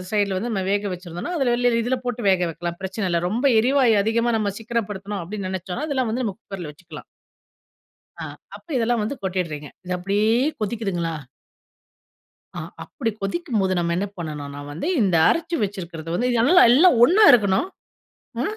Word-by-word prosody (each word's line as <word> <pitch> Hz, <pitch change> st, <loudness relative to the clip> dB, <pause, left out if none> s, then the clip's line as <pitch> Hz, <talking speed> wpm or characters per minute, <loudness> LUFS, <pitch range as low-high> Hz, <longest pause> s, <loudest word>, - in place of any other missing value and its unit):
சைடுல 200 Hz, -2 st, +1 dB
வந்து 235 Hz, +5 st, -3 dB
நம்ம 190 Hz, -3 st, -1 dB
வேக 205 Hz, 0 st, 0 dB
வச்சிருந்தோம்னா, 175 Hz, -, -6 dB
அதுல 260 Hz, -4 st, +2 dB
வெளில 245 Hz, -1 st, +2 dB
இதில 255 Hz, +1 st, 0 dB
போட்டு 240 Hz, -2 st, -3 dB
வேக 180 Hz, -1 st, +2 dB
வைக்கலாம். 170 Hz, +1 st, -5 dB
பிரச்சனை 190 Hz, +1 st, -3 dB
இல்ல. 170 Hz, -, +1 dB
ரொம்ப 235 Hz, +7 st, -2 dB, 0.2 s
எரிவாயு 250 Hz, -2 st, +3 dB
அதிகமா 230 Hz, +2 st, +1 dB
நம்ம 205 Hz, -2 st, -1 dB
சிக்கனப்படுத்தணும் 210 Hz, -3 st, -3 dB
அப்படின்னு 195 Hz, +2 st, -5 dB
நினைச்சோம்னா 190 Hz, -, -4 dB
அதெல்லாம் 260 Hz, -6 st, 0 dB
வந்து 250 Hz, +1 st, -1 dB
நம்ம 205 Hz, -3 st, -3 dB
குக்கர்ல 185 Hz, -8 st, -7 dB
வச்சுக்கலாம். 170 Hz, +3 st, -12 dB, 1.1 s
அ. -, -, -6 dB, 0.3 s
அப்ப -, -, -20 dB
இதெல்லாம் 235 Hz, -1 st, +1 dB
வந்து 245 Hz, +7 st, -3 dB
கொட்டிடுறீங்க! 165 Hz, -6 st, -3 dB, 0.2 s
இத 180 Hz, -, -9 dB
அப்படியே 200 Hz, +4 st, 0 dB, 0.3 s
கொதிக்குதுங்கலா? 195 Hz, -6 st, -2 dB, 1.4 s
அ -, -, -3 dB, 0.2 s
அப்படி 230 Hz, -6 st, -3 dB
கொதிக்கும்போது 205 Hz, -, -1 dB
நம்ம 170 Hz, 0 st, 0 dB
என்ன 200 Hz, +3 st, -1 dB
பண்ணணும்ன்னா 145 Hz, -3 st, -6 dB
வந்து, 165 Hz, -, -5 dB, 0.2 s
இந்த 185 Hz, -5 st, +2 dB
அரைச்சு 335 Hz, 0 st, 0 dB
வச்சுருக்கறத 170 Hz, -5 st, -6 dB
வந்து, 245 Hz, +7 st, 0 dB
நல்லா 350 Hz, +10 st, +6 dB
எல்லாம் 285 Hz, -2 st, +6 dB
ஒன்னா 410 Hz, -, +5 dB
இருக்கணும். 200 Hz, -, +3 dB, 0.7 s
அ, -, -, +1 dB
205 Hz, 160 wpm, -23 LUFS, 180-240 Hz, 1.4 s, நல்லா